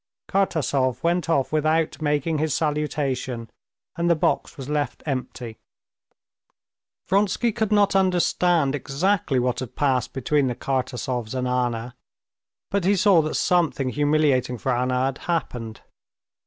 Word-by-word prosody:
Kartasov 140 - 0
went 170 0 +1
out 140 -5 +1
without 155 +1 +1
making 150 +1 0
his 155 -1 0
salutation, 140 -6 -2 0.4
and 170 0 0
the 170 - +5
box 155 - -1
was 135 -2 -7
left 150 0 -2
empty. 125 -5 -5 1.5
Vronsky 205 +4 +1
could 220 -1 -2
not 205 -2 +3
understand 175 -5 +2
exactly 145 +2 0
what 125 0 0
had 130 -1 -7
passed 130 -4 +1
between 135 +2 +1
the 125 - -2
Kartasovs 125 -3 -3
and 125 0 -1
Anna, 120 -1 -1 0.8
but 200 -2 0
he 200 +3 +3
saw 195 -3 +5
that 155 0 -3
something 165 -7 +1
humiliating 145 -3 +1
for 125 +2 -1
Anna 125 +1 +1
had 135 0 -2
happened. 120 -10 -3
145 Hz, 130 wpm, -24 LUFS, 125-170 Hz, 1.5 s, the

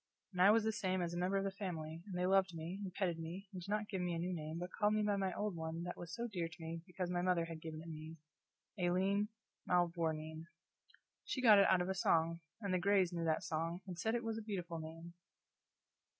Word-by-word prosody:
And 180 - 0
I 195 - +9
was 220 +1 +6
the 220 - +2
same 185 -4 0
as 175 -1 -1
a - - -2
member 185 +2 +2
of 195 - +1
the 195 - -1
family; 165 -5 -4
and 185 -3 -4
they 180 - +1
loved 190 -2 +3
me, 165 +4 -4
and 195 -2 -4
petted 180 -3 -1
me, 175 +5 -6
and 185 - -5
did 175 - -9
not 210 0 0
give 190 -3 -2
me 175 -1 0
a - - -1
new 180 +2 -1
name, 155 -1 -4
but 180 +2 -4
called 210 0 +2
me 215 - +2
by 205 -1 +2
my 195 -1 0
old 210 -3 -1
one 160 +1 -3
that 175 - -4
was 175 +4 -7
dear 175 -4 -1
to 165 - -12
me 165 0 -5
because 180 0 -3
my 175 0 +1
mother 180 -2 +2
had 165 -1 -7
given 160 -1 -6
it - - -11
me 160 0 -7 0.6
Aileen 190 +3 +2 0.4
Mavourneen. 165 -2 0 0.8
She - - -2
got 220 -5 +8
it 195 - +7
out 185 - +5
of - - -4
a - - +2
song; 165 -2 +2 0.2
and 200 -3 -1
the 185 - +3
Grays 190 -1 +3
knew 170 -1 -1
that 160 -1 +1
song, 165 +3 -2
and 185 -2 -5
said 220 +5 +1
it 240 - -1
was 225 -1 -2
a - - -5
beautiful 180 -6 -4
name. 165 +2 -8
180 Hz, 250 wpm, -37 LUFS, 165-195 Hz, 0.8 s, I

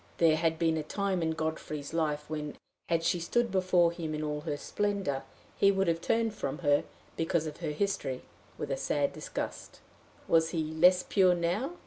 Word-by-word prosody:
There 165 -2 +5
had 160 0 +1
been 160 -1 +2
a - - 0
time 190 +3 -1
in 160 -1 0
Godfrey's 155 -2 -4
life 150 -2 0
when, 150 -1 -4 0.3
had 165 -1 +2
she 175 - +2
stood 235 +7 0
before 185 -2 +3
him 160 -2 -4
in 155 - -3
all 150 -1 -2
her 150 -1 -3
splendor, 200 -6 -1 0.3
he 200 - +5
would 195 -1 +1
have 165 0 +1
turned 225 +2 +1
from 140 -8 -3
her, 145 0 +4 0.3
because 165 0 0
of 150 -1 -6
her 165 -3 -3
history, 150 -5 -2 0.3
with - - -4
a - - 0
sad 145 -1 0
disgust. - - -6 0.5
Was 160 -1 +4
he 160 -2 -2
less 180 +3 +5
pure 185 -3 +4
now? 180 - -1
165 Hz, 185 wpm, -30 LUFS, 155-185 Hz, 0.5 s, There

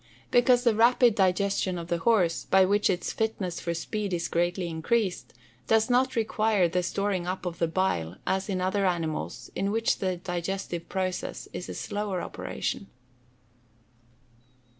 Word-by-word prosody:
_ - - -35
Because 245 0 +5
the 235 -3 +4
rapid 235 +1 +5
digestion 190 -1 +1
of 170 -1 -6
the 170 - 0
horse, 180 -4 +2
by 190 0 +5
which 205 +2 +2
its 180 -2 -1
fitness 205 -6 -2
for 170 -1 -3
speed 200 +3 -3
is 170 - -3
greatly 175 +1 0
increased, 180 +4 -1 0.4
does 220 +2 +3
not 260 +1 +3
require 215 -4 +2
the 180 +2 0
storing 185 0 -1
up 185 +1 -3
of 175 -1 -4
the 170 - +2
bile 160 - -1
as 190 +2 -1
in 185 -2 -1
other 190 +1 +1
animals 165 -3 -3
in 195 - 0
which 225 +2 +1
the 185 -2 -1
digestive 175 -1 -4
process 185 -1 -3
is 180 - -6
a - - -5
slower 205 -3 -3
operation. - - -4
190 Hz, 160 wpm, -27 LUFS, 175-210 Hz, 0.4 s, Because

